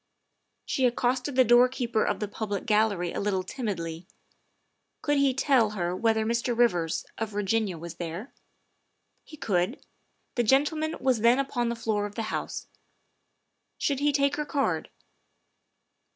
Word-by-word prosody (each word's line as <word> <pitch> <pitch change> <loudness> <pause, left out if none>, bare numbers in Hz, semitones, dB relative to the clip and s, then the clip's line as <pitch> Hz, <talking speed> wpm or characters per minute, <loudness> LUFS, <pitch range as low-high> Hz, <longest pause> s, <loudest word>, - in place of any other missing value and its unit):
She 260 -2 +2
accosted 250 +3 -1
the 260 - +6
doorkeeper 240 -1 +3
of - - -1
the 210 - -2
public 205 -1 -4
gallery 210 -5 +1
a - - -3
little 195 -2 0
timidly. 175 -8 -4 1.0
Could 290 -1 +2
he 280 -1 +4
tell 260 -4 +3
her 175 0 -1
whether 220 +1 +1
Mr. 235 +1 0
Rivers, 175 -9 +1
of 225 -1 -2
Virginia, 205 -2 -1
was 170 +1 -8
there? 175 +8 -6 0.9
He 305 - -13
could; 190 +1 -1 0.5
the 240 - +1
gentleman 295 +6 +2
was 255 -4 +2
then 235 +3 +5
upon 255 -3 -1
the 235 - -2
floor 215 -3 -1
of 205 - -13
the 225 - -2
House. - - -4 1.1
Should 280 -2 0
he 295 +1 +2
take 280 0 +1
her 300 - -2
card? 285 -2 -1
230 Hz, 145 wpm, -27 LUFS, 205-265 Hz, 1.1 s, the